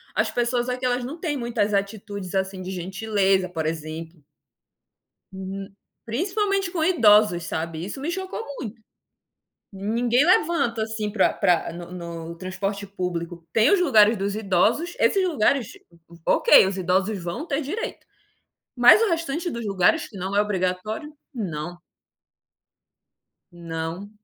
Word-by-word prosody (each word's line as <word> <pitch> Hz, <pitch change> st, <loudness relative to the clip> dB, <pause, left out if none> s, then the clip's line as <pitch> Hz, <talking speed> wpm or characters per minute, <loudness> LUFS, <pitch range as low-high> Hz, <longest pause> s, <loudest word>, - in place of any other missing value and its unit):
as -, -, +1 dB
pessoas 240 Hz, +1 st, 0 dB
aqui, 250 Hz, +1 st, -2 dB
elas 245 Hz, 0 st, 0 dB
não 300 Hz, +7 st, -6 dB
têm 310 Hz, -4 st, -2 dB
muitas 235 Hz, -5 st, -1 dB
atitudes, 200 Hz, -1 st, -3 dB
assim, 190 Hz, 0 st, -2 dB
de 185 Hz, +1 st, -5 dB
gentileza, 190 Hz, 0 st, 0 dB
por 165 Hz, -3 st, -3 dB
exemplo. 160 Hz, 0 st, -5 dB, 1.1 s
Hum. 195 Hz, +1 st, -7 dB, 0.3 s
Principalmente 390 Hz, -, -1 dB
com 340 Hz, -4 st, -1 dB
idosos, 210 Hz, -, +5 dB
sabe, 160 Hz, +1 st, -4 dB
isso 205 Hz, +8 st, -6 dB
me 300 Hz, +5 st, -2 dB
chocou 380 Hz, +5 st, -4 dB
muito. 230 Hz, -1 st, -7 dB, 0.9 s
Ninguém 230 Hz, +6 st, +1 dB
levanta, 315 Hz, -9 st, +2 dB
assim, 220 Hz, -1 st, -3 dB
pra 220 Hz, -, +2 dB
pra 175 Hz, -1 st, +1 dB
no 170 Hz, 0 st, -9 dB
no 170 Hz, -1 st, -7 dB
transporte 195 Hz, +3 st, -4 dB
público. 175 Hz, -3 st, -5 dB
Tem 225 Hz, +5 st, +4 dB
os 400 Hz, -, +4 dB
lugares 225 Hz, -9 st, +5 dB
dos 200 Hz, 0 st, -2 dB
idosos, 215 Hz, -, +1 dB
esses 385 Hz, -2 st, +3 dB
lugares, 275 Hz, -, +1 dB, 0.6 s
ok, -, -, +6 dB
os 190 Hz, 0 st, -2 dB
idosos 190 Hz, +1 st, 0 dB
vão 175 Hz, -, -4 dB
ter 280 Hz, -3 st, -1 dB
direito. 355 Hz, +11 st, -5 dB, 0.7 s
Mas 245 Hz, -, +8 dB
o 455 Hz, -, +3 dB
restante 330 Hz, +1 st, -1 dB
dos 235 Hz, -5 st, -5 dB
lugares, 195 Hz, -, +2 dB
que 215 Hz, -, -13 dB
não 190 Hz, +1 st, -4 dB
é -, -, +5 dB
obrigatório, 210 Hz, -, -2 dB, 0.2 s
não. 175 Hz, -6 st, -5 dB, 1.7 s
Não. 170 Hz, +3 st, -5 dB
205 Hz, 135 wpm, -24 LUFS, 180-250 Hz, 1.7 s, Mas